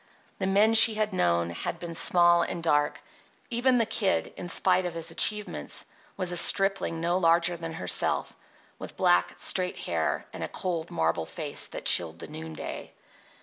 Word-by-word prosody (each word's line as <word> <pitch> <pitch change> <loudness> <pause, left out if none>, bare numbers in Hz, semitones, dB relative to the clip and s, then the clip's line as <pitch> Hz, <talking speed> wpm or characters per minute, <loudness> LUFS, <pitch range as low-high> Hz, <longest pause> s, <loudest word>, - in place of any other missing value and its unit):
The 190 - -1
men 205 +3 +3
she 225 0 +7
had 215 -1 -1
known 85 - 0
had 85 - -4
been 170 0 -7
small 175 +1 +4
and 170 0 -4
dark. 145 -2 0 0.5
Even 250 +2 +2
the 230 - +2
Kid, 210 -3 -1
in 175 - -7
spite 180 +1 +2
of 170 - -7
his 165 -1 -3
achievements, 210 -1 0 0.3
was 185 -2 0
a 175 - -1
stripling 195 -2 +1
no 175 +2 0
larger 170 0 +2
than 165 -1 -7
herself, 90 - 0 0.4
with - - -10
black, 90 0 +2
straight 180 - -1
hair - - -2
and - - -6
a - - -3
cold, 170 -3 -4
marble 80 0 -1
face - - -3
that - - -9
chilled 80 -2 +4
the - - -8
noonday. 160 +1 -8
170 Hz, 170 wpm, -27 LUFS, 160-195 Hz, 0.5 s, she